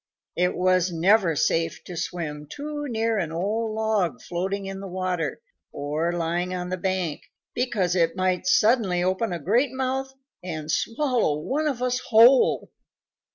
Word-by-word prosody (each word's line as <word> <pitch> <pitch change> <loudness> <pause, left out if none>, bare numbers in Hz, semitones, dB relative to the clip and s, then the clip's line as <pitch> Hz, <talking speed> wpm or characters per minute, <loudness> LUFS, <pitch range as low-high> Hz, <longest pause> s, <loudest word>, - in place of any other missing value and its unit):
It 180 +1 +1
was 185 0 +2
never 175 0 +3
safe 165 +3 0
to 180 - -8
swim 160 -3 -4
too 295 0 -5
near 225 -2 0
an 165 -4 -2
old 215 +6 -2
log 210 - 0
floating 190 +6 -3
in 195 0 -5
the 195 - -7
water 185 -2 -2 0.3
or 150 +4 -2
lying 175 +2 -1
on 180 0 -4
the 185 - -2
bank, 185 -4 -2 0.3
because 215 -8 0
it 165 -2 +2
might 185 -1 0
suddenly 205 -4 +3
open 185 +4 0
a 175 - -2
great 230 - +1
mouth 265 +1 -2 0.3
and 155 -3 -4
swallow 230 - +1
one 285 - -1
of 255 -4 -2
us 250 0 0
whole." 240 +4 +5
185 Hz, 155 wpm, -25 LUFS, 170-230 Hz, 0.3 s, whole